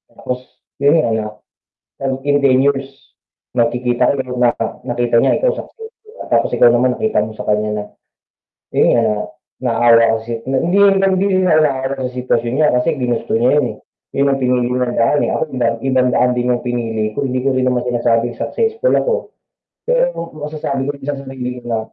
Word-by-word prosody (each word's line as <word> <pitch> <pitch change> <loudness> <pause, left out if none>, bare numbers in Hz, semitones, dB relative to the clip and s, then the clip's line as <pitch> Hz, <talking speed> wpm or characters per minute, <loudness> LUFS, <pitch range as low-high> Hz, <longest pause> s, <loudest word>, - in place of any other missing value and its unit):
Tapos 125 0 -4 0.4
yo'n 140 +3 +3
nga 115 - -1 0.9
na, 135 - -5 0.2
in 145 0 +2
10 135 -2 +3
years, 135 -1 -2 0.4
magkikita 120 +2 +1
kayo 130 -2 -4
na 120 -1 +3 0.3
nakita 120 -1 +1
niya - - +3
ikaw - - +2
successful 450 -2 -11 0.2
tapos - - +3
ikaw 120 - +6
naman 125 +1 +2
nakita 220 0 0
mo 110 +1 -5
sa - - -6
kaniya 105 0 0
na, 105 - -3 0.9
yo'n - - +3
nga, 115 - +3 0.6
naawa 115 -1 +4
kasi 115 0 -6
hindi 135 +8 0
hindi 195 -1 +4 0.2
naawa 140 -6 +1
sa 125 -1 -4
sitwasyon 120 -2 -1
niya 150 +3 +3
kasi 125 - -1
ginusto 120 -2 -2
niya 120 +3 +3
yun, 145 -4 +2
eh. - - -17 0.4
'Yon 140 +1 +2
ang 135 0 0
pinili 125 -1 +1
niyang 125 -1 -1
daan, 115 +6 +2
eh, - - -1
ako - - 0
ibang 115 -2 +1
ibang 130 -1 +2
daan 125 +1 +3
din 125 0 0
'yong 120 - -3
pinili 115 -3 -2
ko. 140 - 0
Hindi 130 0 -2
ko 135 - +2
rin 130 0 0
naman 125 -1 0
sinasabing 120 -1 0
successful 455 +1 -1
ako. - - +1 0.8
Pero - - 0
masasabi 150 -3 -3
ko 145 - -1
sa 140 0 -3
sarili 130 -2 -6
ko - - -9
na, 115 -2 -1
125 Hz, 180 wpm, -17 LUFS, 120-145 Hz, 0.9 s, ikaw